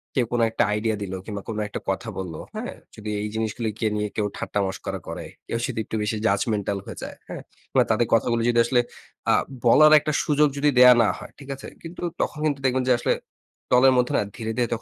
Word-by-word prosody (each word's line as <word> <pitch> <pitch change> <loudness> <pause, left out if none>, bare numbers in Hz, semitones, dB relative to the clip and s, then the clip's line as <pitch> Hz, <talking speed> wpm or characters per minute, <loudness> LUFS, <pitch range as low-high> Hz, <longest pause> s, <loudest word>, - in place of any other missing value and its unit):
কেউ 125 -3 +2
কোনো 120 -1 +2
একটা 115 - +2
আইডিয়া 110 +1 0
দিল 95 -1 -5
কিংবা 100 -2 -5
কোনো 110 -1 -3
একটা 105 - -5
কথা 95 +4 -2
বললো, 90 -4 -5 0.2
হ্যাঁ? - - -4 0.2
যদি 105 0 -7
এই 105 - -2
জিনিসগুলিকে 110 0 -2
নিয়ে 105 0 -1
কেউ 105 -1 0
ঠাট্টা 105 - -2
মস্করা 95 - -5
করে, - - -6 0.2
কেউ 115 - -2
যদি 125 -4 -4
একটু - - -5
বেশি 105 +1 -1
judgemental 100 -1 +1
হয়ে - - -8
যায়। - - -7
হ্যা? - - -5 0.3
কিংবা - - +3
তাদের 110 +1 +2
কথাগুলি 115 +1 +2
যদি 120 -1 +3
আসলে 125 +1 +2 0.5
আ - - +5 0.3
বলার 155 +6 +7
একটা 155 - -2
সুযোগ 150 0 +3
যদি 145 +1 +3
দেওয়া 125 0 +10
না 105 - +3
হয়। - - -10
ঠিক 140 -1 -12
আছে? 135 - -10 0.2
কিন্তু 165 +1 -9 0.2
তখন 150 - -2
কিন্তু 145 -3 0
দেখবেন 130 0 +2
যে - - +7
আসলে - - +2 0.6
দলের 130 +1 +6
মধ্যে 125 0 +2
না - - +3
ধীরে, 110 -2 -4
ধীরে 120 -1 +2
115 Hz, 215 wpm, -24 LUFS, 105-130 Hz, 0.6 s, দেওয়া